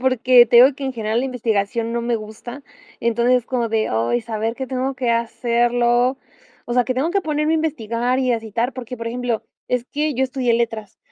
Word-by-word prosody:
porque 255 -1 +5
te 235 - +3
digo 255 +3 +8
que 280 - -7
en 265 - -2
general 220 0 -1
la 260 - -2
investigación 230 -2 -1
no 235 - -1
me 235 0 0
gusta. 225 +5 -9 0.4
Entonces 235 +2 +2
es 240 - -11
como 240 -3 -1
de: 220 0 0
"Ay, 115 - 0
saber 225 0 -3
que 265 0 -5
tengo 260 +1 -2
que 250 -2 -1
hacerlo". 240 +2 +1 0.5
O 240 - -3
sea 250 - +3
que 255 - -2
tengo 280 +7 0
que 395 - +1
ponerme 305 -2 0
a - - +3
investigar 245 -5 -1
y 255 -2 +1
a 230 - -1
citar 230 +4 -2
porque, 250 -1 -7
por 230 0 -6
ejemplo, 245 -1 -2 0.2
es 250 -1 0
que 300 0 -2
yo 265 +2 +1
estudié 255 -2 -1
letras, 225 -3 -3
240 Hz, 215 wpm, -20 LUFS, 230-255 Hz, 0.5 s, digo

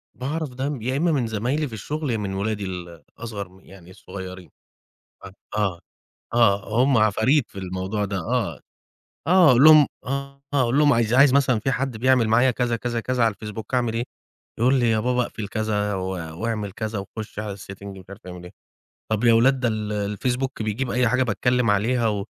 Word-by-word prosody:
باعرف 150 +4 -3
ده 130 +3 -3
م 140 -5 -5
يا 130 +4 -1
إمّا 170 +3 +2
من 135 -6 0
زمايلي 125 +8 -1
في 120 - -11
الشُغل 150 +8 -4
يا 120 - +1
إمّا 105 -2 -3
من 95 - -4
ولادي 100 +1 -2
ال 90 -3 -7
أصغر 105 -5 -6
م 95 +1 -19
يعني 95 -2 -16
الصغيّرين 95 -1 -9 0.7
آه، 95 - -11 0.2
آه 95 -5 0 0.6
آه، 110 0 +3
هم 135 0 +3
عفاريت 110 +6 +2
في - - -10
الموضوع 95 +3 -3
ده 100 -1 -3
آه 80 - -2 0.7
آه، 180 -2 +6
أقول 125 +2 +5
لهم 155 -2 +9 0.2
آه، 140 +1 -5
آه، - - +3
هاقول 125 +1 +2
لهم 150 -1 +5
"عايز 115 -1 +1
عايز 135 +1 +6
مثلًا 130 -4 +3
في 135 - -1
حد 130 -2 -2
بيعمل 125 0 +3
معايا 120 +4 +4
كذا، 120 -1 -1
كذا، 120 0 -3
كذا 125 0 0
على 115 - +2
الفيسبوك 110 +3 -7
أعمل 120 -3 +1
إيه؟" 115 +1 -1 0.6
يقول 125 +4 +4
لي 120 -2 +2
"يا 110 - +2
بابا 125 +2 +1
أقفل 110 -3 -5
كذا 105 -1 -1
و 95 -1 -3 0.4
وأعمل 110 -3 -2
كذا 110 +1 -4
وخُش 105 +2 -8
على 105 -2 -5
الsetting، 100 0 -11
مش 95 - -13
عارف 100 -1 -12
أعمل 90 -1 -9
إيه." 90 - -11 0.6
طَب 110 0 0
يا 120 -1 +6
ولاد 130 +4 +4
"ده 125 - +1
ال 110 -2 -2
الفيسبوك 125 +6 -2
بيجيب 115 +4 -2
أي 125 0 +2
حاجة 125 +3 +2
باتكلّم 125 +1 +1
عليها 115 +4 +2
و 100 -2 -2
115 Hz, 205 wpm, -23 LUFS, 100-130 Hz, 0.7 s, لهم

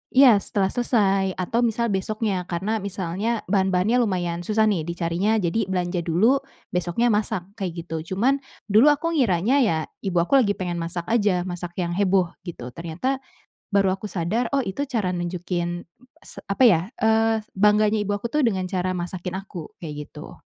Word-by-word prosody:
Iya, 255 -6 +8
setelah 195 -1 -1
selesai 195 -6 +1
atau 185 +6 -1
misal 230 0 0
besoknya 195 -1 -1
karena 200 +6 -1
misalnya 200 +3 -2
bahan-bahannya 190 +4 +2
lumayan 175 -6 0
susah 220 0 +3
nih 185 -7 +1
dicarinya 170 +5 0
jadi 190 +4 0
belanja 180 -1 -1
dulu, 220 +12 +3 0.3
besoknya 180 +7 +1
masak, 210 -4 0 0.2
kayak 175 -3 -4
gitu, 165 +2 -5
cuman 265 +7 +2 0.3
dulu 225 +8 +6
aku 330 +3 -2
ngiranya 245 - +2
ya 205 -11 +3 0.3
ibu 180 -2 -1
aku 270 +9 +4
lagi 205 -4 +2
pengen 175 -2 -3
masak 170 +1 -3
aja 200 -6 +2
masak 175 -1 -6
yang 170 0 -2
heboh 185 -2 +2 0.2
gitu, 125 -7 -6
ternyata, 170 - -3 0.5
baru 195 -2 +3
aku 195 - -15
sadar, 210 +9 -1
oh, 275 - +3
itu 255 +6 -2
cara 205 -9 -1
nunjukin, 175 0 -3 0.3
s - - -11
apa 200 +6 +2
ya, 175 -8 +5 0.2
eee, 220 0 +3 0.2
bangganya 210 +1 +4
ibu 205 - -1
aku 205 +3 -2
tuh 300 +2 +1
dengan 190 -5 0
cara 185 0 -1
masakin 180 0 -4
aku, 185 -5 -9
kayak 155 -3 -6 0.2
gitu. 150 +2 -10
190 Hz, 165 wpm, -24 LUFS, 175-220 Hz, 0.5 s, Iya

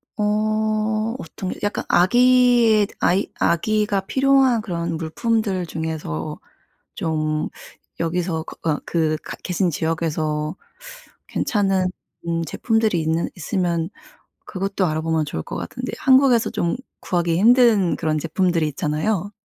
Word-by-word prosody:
어 215 +1 0
어떤 185 - -6
게 - - -6
약간 205 - -1
아기의 240 +1 +5
아이 190 +3 +2
아기가 210 +3 +1
필요한 265 +2 +3
그런 170 -4 -3
물품들 195 +3 -1
중에서 160 - -4 0.6
좀 155 -1 -1 0.5
여기서 165 0 -1
그 - - -10
어 150 -2 0
그 160 -2 0
가 - - -7
계신 180 0 0
지역에서 160 0 -2 0.7
괜찮은 195 -4 +1 0.4
음 165 0 0
제품들이 220 +3 0
있는 160 +1 0
있으면 175 -2 -1 0.6
그것도 195 -1 -1
알아보면 160 0 0
좋을 80 - -4
것 - - -7
같은데 - - -5
한국에서 260 -3 +4
좀 175 -6 -1 0.3
구하기 170 -2 0
힘든 225 -3 +5
그런 155 -2 -1
제품들이 165 +1 0
있잖아요. 165 +8 -2
180 Hz, 260 characters per minute, -22 LUFS, 160-215 Hz, 0.7 s, 아기의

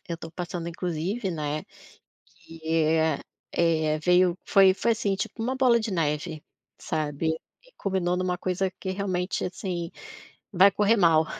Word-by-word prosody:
eu 170 - -3
tô 165 0 -9
passando 175 -1 -4
inclusive, 180 +5 -2
né, 150 -2 -3 0.6
que, 165 0 -16
eh 160 -1 +2 0.4
eh, 160 -2 +2
veio 180 +2 +3
foi 195 -1 +6
foi 230 +4 +1
assim, 205 -3 0
tipo, 225 +3 -4
uma 255 +3 -1
bola 250 -3 +4
de 220 -1 -3
neve, 155 -1 -1 0.4
sabe? 155 +1 -1 0.3
E - - -23
culminou 185 -2 0
numa 180 -1 -1
coisa 185 +1 -1
que 190 - -3
realmente, 185 -1 -2
assim, 180 -2 -4 0.6
vai 190 +1 +7
correr 210 +3 +3
mal. 165 -4 +5
180 Hz, 145 wpm, -26 LUFS, 160-195 Hz, 0.6 s, vai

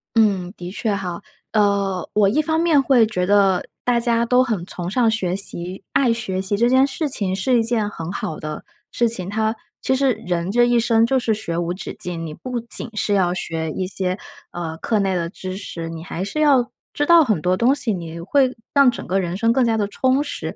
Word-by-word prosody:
嗯， 195 -5 +2
的 175 0 -7
确 215 +1 -1
哈， 180 -2 -5 0.3
呃， 200 -3 +1
我 205 -2 +4
一 240 - +1
方 320 +1 +1
面 320 -5 +4
会 260 -4 +4
觉 180 -5 -1
得 195 -1 +3 0.2
大 245 -1 +2
家 235 0 +1
都 250 +1 +4
很 220 -9 -2
崇 175 -2 -5
尚 235 0 +3
学 190 -5 -1
习， 185 -1 -3
爱 250 -4 +3
学 220 -5 -2
习 190 +2 -1
这 235 +4 +2
件 260 +2 +5
事 290 +2 -2
情 190 -6 -1
是 245 +6 +2
一 230 - +2
件 225 -2 +1
很 165 -3 -6
好 160 -5 -4
的 155 0 -6 0.3
事 235 -1 +1
情。 185 -6 -3
它 220 +2 -1 0.3
其 265 - +1
实 265 -1 +3
人 180 -5 -3
这 240 +2 +4
一 240 0 +3
生 230 -1 +3
就 265 - +2
是 235 -3 +1
学 205 -6 -3
无 175 0 -1
止 185 - -7
境， 170 -2 -4
你 - - -7
不 250 -2 -4
仅 235 0 +1
是 205 -1 +1
要 180 -2 +2
学 160 -3 -3
一 185 +2 -3
些， 185 0 -3 0.3
呃， 165 -2 -5
课 215 +5 0
内 195 -1 0
的 170 -1 -2
知 185 -1 -6
识， 165 -4 -5
你 165 0 -7
还 180 +1 -5
是 205 +10 -3
要 275 -5 +4 0.2
知 290 - -1
道 340 -2 +7
很 215 - 0
多 180 +2 +1
东 245 +7 +3
西， 255 -5 -1
你 170 -3 -5
会 255 +9 +1 0.2
让 280 -3 +5
整 235 - -8
个 190 - 0
人 175 -1 -3
生 230 +3 +2
更 250 +1 +3
加 225 -1 +1
地 205 -2 0
充 260 +6 +1
实， - - -5
205 Hz, 245 characters per minute, -21 LUFS, 180-240 Hz, 0.3 s, 道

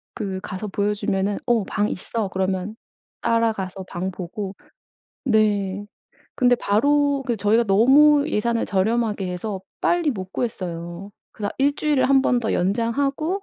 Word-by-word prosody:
그 195 -4 -3
가서 205 +1 -5
보여주면은 200 0 -1
"어 240 -3 +2
방 205 +2 -1
있어." 215 +3 -3
그러면 190 +2 -2 0.5
따라가서 215 -5 0
방 185 +2 -3
보고 190 +2 -6 0.7
네 205 -2 +1 0.5
근데 245 -2 +4
바로 285 +6 +2
그 235 -3 0
저희가 215 +3 +3
너무 285 +8 +5
예산을 230 -3 0
저렴하게 210 0 0
해서 190 +2 -4 0.2
빨리 345 -4 +2
못 190 -5 -6
구했어요. 175 -4 -4 0.2
그러다 205 -1 -4
1 285 +1 +3
주일을 295 -4 +1
1 270 -1 +5
번 250 - +2
더 225 - -1
연장하고 275 - 0
210 Hz, 275 characters per minute, -23 LUFS, 190-245 Hz, 0.7 s, 너무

